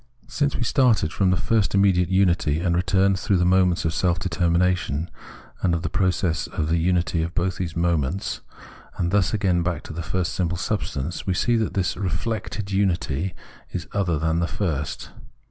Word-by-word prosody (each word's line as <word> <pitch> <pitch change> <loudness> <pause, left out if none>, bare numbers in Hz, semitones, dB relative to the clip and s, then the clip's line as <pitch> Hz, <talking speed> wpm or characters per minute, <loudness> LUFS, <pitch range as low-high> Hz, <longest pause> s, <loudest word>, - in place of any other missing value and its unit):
Since 145 -2 -1
we - - -1
started 120 - +2
from 95 -2 +2
the 90 - +2
first 105 -1 +1
immediate 95 -3 +3
unity, 90 -5 +2
and 85 0 +1
returned 95 +2 +2
through 100 -1 +1
the 90 - +2
moments 90 -1 +3
of 80 - 0
form 90 0 +1
determination, 85 -3 0 0.5
and 85 -2 +2
of 85 - -3
process, 90 -3 0
to 80 - -3
the 80 +2 +1
unity 85 0 +1
of 85 +2 -4
both 90 +1 0
these 85 -3 -4
moments, 85 0 -1 0.6
and 85 -1 0
thus 100 -2 +2
again 95 -5 +1
back 85 -2 -2
to - - -8
the 85 - -4
first 85 +2 -2
simple 85 -2 -1
substance, 85 -5 -3
we 95 - +1
see 120 +4 +2
that 110 -2 -1
this 95 -3 0
reflected 100 +2 -3
unity 95 -3 0 0.3
is - - -5
other 90 -6 +1
than 80 +2 0
the 85 - 0
first. 75 -9 -3
90 Hz, 180 wpm, -23 LUFS, 85-95 Hz, 0.6 s, immediate